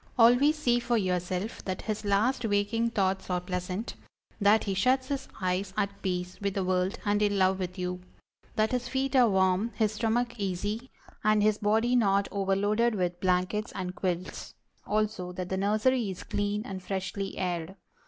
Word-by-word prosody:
Always 245 +6 +6
see 240 -5 +2
for 240 0 +1
yourself 185 +1 -2
that 185 -1 -3
his 215 -1 -3
last 215 +6 +2
waking 220 +2 +1
thoughts 190 -4 0
are 180 -1 +1
pleasant; 180 +3 -4 0.5
that 210 +1 +4
he 200 - -1
shuts 255 +7 +2
his 275 -1 -3
eyes 185 0 -1
at 200 -1 -1
peace 180 -1 -3
with 200 -1 -1
the 195 - 0
world 185 +1 0
and 205 0 +2
in 205 -1 +2
love 190 0 +3
with 180 0 -4
you; 180 0 -3 0.5
that 215 0 +2
his 250 -1 -1
feet 270 +1 -1
are 245 -3 +6
warm, 190 +2 +2
his 215 -2 +2
stomach 235 +2 -1
easy, 205 +6 -2 0.3
and 215 -1 +4
his 215 0 +3
body 220 +4 +2
not 200 -4 +3
overloaded 205 +4 +1
with 180 -2 -1
blankets 185 +4 0
and 180 -1 -4
quilts; 180 0 -4 0.3
also, 210 -4 -1
that 180 0 -5
the 190 - -1
nursery 215 +4 +2
is 185 - -6
clean 205 +1 -1
and 190 -3 -6
freshly 195 +1 -4
aired. 180 -1 -2
200 Hz, 175 wpm, -29 LUFS, 185-225 Hz, 0.5 s, Always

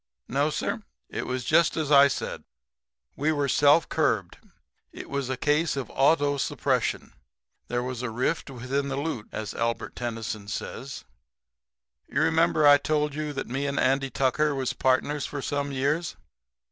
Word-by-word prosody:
"No, 140 +4 +1
sir, 205 +8 -2 0.3
it - - -4
was 125 -1 -3
just 170 - +3
as 155 -2 -1
I 140 -1 +8
said. 140 - -4 0.7
We 150 +3 +1
were 145 -2 0
self 145 +4 +4
curbed. - - 0 0.5
It - - -10
was 140 -2 -2
a 130 - -2
case 150 +2 +1
of 135 - -4
auto 145 0 +3
suppression. - - -1 0.5
There 120 0 -1
was 125 -1 -4
a 125 - -2
rift 125 +8 -1
within 135 +2 -2
the 135 - -2
loot, 140 -7 -3
as 110 -1 -5
Albert 115 0 -2
Tennyson 115 -3 -4
says. 130 +5 -6 1.0
"You 140 - -1
remember 160 -1 +3
I 145 0 +8
told 150 0 0
you 150 0 -3
that 140 - -3
me 135 +4 -2
and 140 0 -1
Andy 135 +1 +2
Tucker 140 +3 +1
was 130 -2 -1
partners 130 +2 +1
for 145 - -5
some 140 +1 -2
years. 145 +5 -1
140 Hz, 160 wpm, -26 LUFS, 130-150 Hz, 1.0 s, I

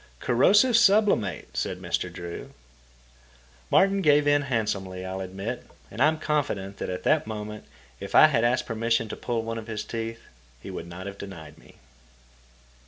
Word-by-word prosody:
"Corrosive 205 - +4
sublimate," 195 - +3
said - - -2
Mr. - - -2
Drew. 85 -1 -8 1.2
Martin 195 0 +4
gave 150 -3 +4
in 145 0 +4
handsomely, 100 -8 -2
I'll 95 +1 -4
admit, 95 +6 -5 0.3
and 110 - -6
I 145 - +7
am 160 0 +1
confident 140 -11 -2
that - - -4
at 90 0 -4
that 155 -7 +2
moment, 105 -1 -6 0.3
if 100 - -6
I - - +10
had 130 -7 +2
asked 125 +2 +2
permission 115 0 0
to - - -5
pull 115 -2 -2
one 115 0 -4
of 110 - -10
his 110 -2 -4
teeth, 115 0 -5 0.4
he - - -9
would 85 - -6
not 90 +2 -8
have 100 0 -7
denied 80 -6 -10
me. - - -19
115 Hz, 170 wpm, -26 LUFS, 95-145 Hz, 1.2 s, I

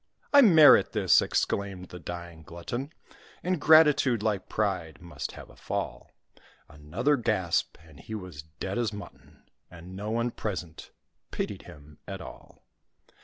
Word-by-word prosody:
"I 285 - +9
merit 160 - +7
this!" - - +4
exclaimed 95 -2 -2
the 90 - -9
dying 85 0 -8
glutton; 120 - -6 0.5
"Ingratitude, 150 - +4
like 105 -4 -1
pride, 90 -9 -2
must 85 -1 -7
have - - -12
a - - -18
fall:" - - -5 0.6
Another 75 - -1
gasp, 105 -8 -1
and 80 -3 -17
he 110 +7 -7
was 90 -8 -8
dead 80 +7 -6
as 115 -3 0
mutton; 105 -1 -12 0.3
And 90 +2 -12
no 105 +2 -5
one 115 +2 -1
present 90 -8 -6 0.4
pitied - - -4
him 75 0 -15
at - - -6
all. - - -13
95 Hz, 135 wpm, -28 LUFS, 85-120 Hz, 0.6 s, I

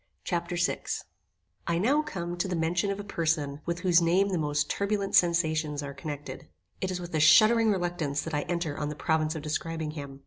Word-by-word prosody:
Chapter 175 0 -2
VI 175 +1 0 0.9
I 170 0 +1
now 265 - +3
come 175 - -5
to 175 - -1
the 185 - -2
mention 170 +4 0
of 200 0 -2
a - - -4
person 155 -6 -1
with 170 +1 -2
whose 180 -2 +4
name 180 +4 +3
the 185 -3 -1
most 150 -1 0
turbulent 200 -1 -1
sensations 160 -4 +2
are 140 0 -6
connected. 145 +1 -7 0.3
It 190 - -1
is 185 -1 -3
with 175 -1 -8
a 155 - +1
shuddering 215 +9 +6
reluctance 175 -7 -1
that 160 - -6
I 150 - +1
enter 170 -4 -1
on 150 0 -3
the 150 - -5
province 155 +1 0
of 155 - -5
describing 160 0 -3
him. 140 -3 -8
170 Hz, 205 wpm, -28 LUFS, 150-180 Hz, 0.9 s, shuddering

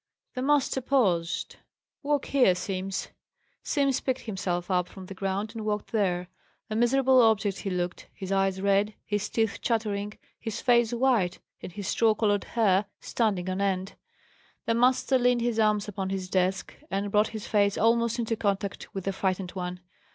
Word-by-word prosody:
The 255 - -4
master 275 -1 +2
paused. 190 -11 0 0.4
"Walk 290 -1 0
here, 250 -10 +4
Simms." 190 +1 -3 0.5
Simms 275 -3 +1
picked 260 -1 -2
himself 185 -4 -3
up 180 -1 +1
from 190 -2 -11
the 195 - -8
ground 195 +2 -2
and 225 -2 -5
walked 210 -1 -2
there. 180 -5 0 0.4
A - - -1
miserable 260 +2 +4
object 215 -3 +2
he 195 - -3
looked; 180 -1 -3
his 190 0 -7
eyes 195 -1 +1
red, 200 +1 +2
his 205 -1 -2
teeth 225 -2 0
chattering, 210 -3 -1 0.2
his 225 -2 -4
face 240 -3 +3
white, 235 -8 +2 0.2
and - - -7
his 200 0 -6
straw 225 -2 +3
coloured 205 -3 +1
hair 205 -4 +2
standing 200 -6 -1
on 185 +1 -2
end. 190 -1 -1 0.7
The 230 - +1
master 255 +2 +3
leaned 245 -1 +3
his 235 -1 0
arms 210 -1 +2
upon 190 -2 -4
his 190 -1 -4
desk, 185 +1 0 0.2
and 200 +1 -2
brought 210 +1 +4
his 220 -2 -7
face 200 -2 +2
almost 230 +1 +2
into 230 -1 -1
contact 200 -2 -2
with 195 - -3
the 195 - -1
frightened 190 -1 -1
one. 180 -1 -5
205 Hz, 170 wpm, -27 LUFS, 190-230 Hz, 0.7 s, here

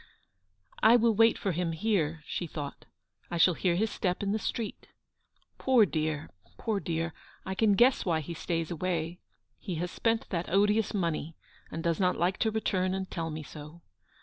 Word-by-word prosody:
" 95 0 -38
I 225 +2 +7
will 230 -1 +4
wait 225 +2 +5
for 195 - -1
him 170 0 -1
here," 160 -5 0
she 175 - -3
thought. 145 -2 -7 0.2
" - - -38
I 175 - -2
shall 175 +2 +5
hear 175 +1 +1
his 215 +4 +1
step 180 +1 -1
in 200 - 0
the 215 - 0
street. 225 0 -4 0.7
Poor 255 -5 +5
dear, 155 -3 -2 0.3
poor 215 -3 -1
dear, 165 -2 -2 0.3
I 190 - -2
can 205 +1 +3
guess 245 +5 +4
why 165 -3 +1
he 170 +3 -6
stays 165 0 -2
away. 170 0 -2 0.4
He 185 -5 -4
has 175 +2 -3
spent 225 -1 0
that 175 -2 -2
odious 210 +3 +2
money, 165 -4 -1 0.3
and 165 - -5
does 170 -2 +1
not 180 -1 +2
like 180 +2 +1
to 220 - +2
return 190 -4 0
and 190 0 -4
tell 165 -1 -3
me 155 0 -5
so. 150 +3 -11
180 Hz, 190 wpm, -30 LUFS, 165-205 Hz, 0.7 s, I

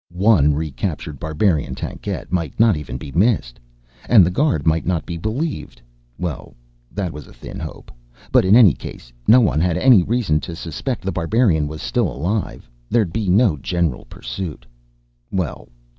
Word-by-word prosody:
One 90 -7 +4
recaptured 75 0 -4
barbarian 80 -4 0
tankette - - -5
might 85 -3 -2
not 115 -3 +5
even 75 -5 -6
be 70 +1 -9
missed. 85 - +1 0.5
And 105 -7 +7
the 90 - 0
guard 130 - +1
might 80 0 +2
not 85 -4 -1
be 85 - -5
believed 115 - -4 0.4
well, 80 -8 -5 0.4
that 95 -4 -3
was 75 -2 -9
a - - -15
thin - - -9
hope - - -8 0.4
but, - - +5
in 95 +3 +5
any 110 - +7
case, - - -10
no 125 +3 +7
one 90 - +2
had 85 0 +1
any 125 -7 +6
reason 100 -6 +1
to 85 +2 -7
suspect 90 - -4
The 95 - -1
Barbarian 85 -3 +1
was 75 +1 -7
still 115 - 0
alive. 90 - -3 0.2
There'd 105 -8 +1
be 105 -4 -1
no 95 -3 +4
general 85 -2 -2
pursuit. 80 -10 -7 0.6
Well 90 -10 -3
85 Hz, 165 wpm, -20 LUFS, 75-105 Hz, 0.6 s, And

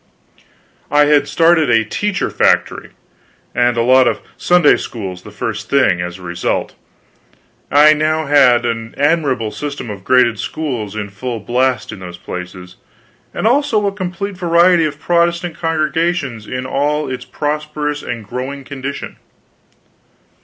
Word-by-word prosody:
I 145 0 +4
had 145 -1 +3
started 165 -3 +3
a 115 -2 +3
teacher 205 - -2
factory - - +1 0.6
and 120 0 +2
a 115 - +2
lot 130 +1 +5
of - - 0 0.2
Sunday 175 -4 +4
schools 95 -6 -6
the - - -12
first 105 0 -5
thing; 105 -11 +3
as 90 +1 -5
a 95 - -14
result, 85 0 -2 1.0
I 150 +2 +6
now 155 +1 0
had 135 -4 +4
an 115 -1 -3
admirable 140 -7 +1
system 140 0 -5
of 100 -2 -9
graded 125 -3 +3
schools 120 -5 -4
in 105 -1 -4
full 115 +3 -5
blast 125 +4 0
in 110 - -9
those 90 -2 -9
places, 90 0 -8 0.5
and - - -4
also 240 -3 +2
a 200 - +1
complete 195 0 -5
variety 170 -1 +4
of 150 -1 -4
Protestant 170 0 0
congregations 160 -7 -1 0.2
all 150 +3 0
in 130 - -3
a - - -12
prosperous 150 0 -3
and 115 -3 -6
growing 130 +5 -5
condition. 140 +1 -6
140 Hz, 140 wpm, -17 LUFS, 115-160 Hz, 1.0 s, I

